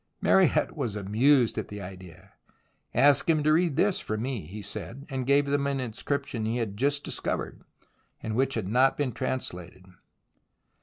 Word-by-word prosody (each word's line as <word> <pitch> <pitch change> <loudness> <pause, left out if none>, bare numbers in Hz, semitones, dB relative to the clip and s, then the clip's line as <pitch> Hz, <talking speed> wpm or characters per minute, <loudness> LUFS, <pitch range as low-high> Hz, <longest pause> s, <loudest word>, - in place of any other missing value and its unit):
Mariette - - +3
was 110 -3 -3
amused 115 +6 +3
at - - -5
the 105 - -8
idea. 90 -3 -11 0.3
" - - -41 0.3
Ask 140 +5 +4
him 155 -2 +3
to 155 +1 +4
read 165 -2 +2
this 200 +4 +2
for 110 - -3
me," 115 - -3
he 105 +4 -8
said, 120 +7 -7
and 130 -2 -3
gave 140 +1 +4
them 140 0 0
an 140 -1 -1
in 125 -4 -4
scription 140 -2 -3
he 110 +2 -1
had 110 -4 -3
just 140 +5 0
discovered - - -4 0.6
and 110 - -3
which 135 +2 +1
had 110 -5 -2
not 125 +6 +3
been 145 -3 0
translated. 95 -9 -5
125 Hz, 175 wpm, -27 LUFS, 105-140 Hz, 0.6 s, Ask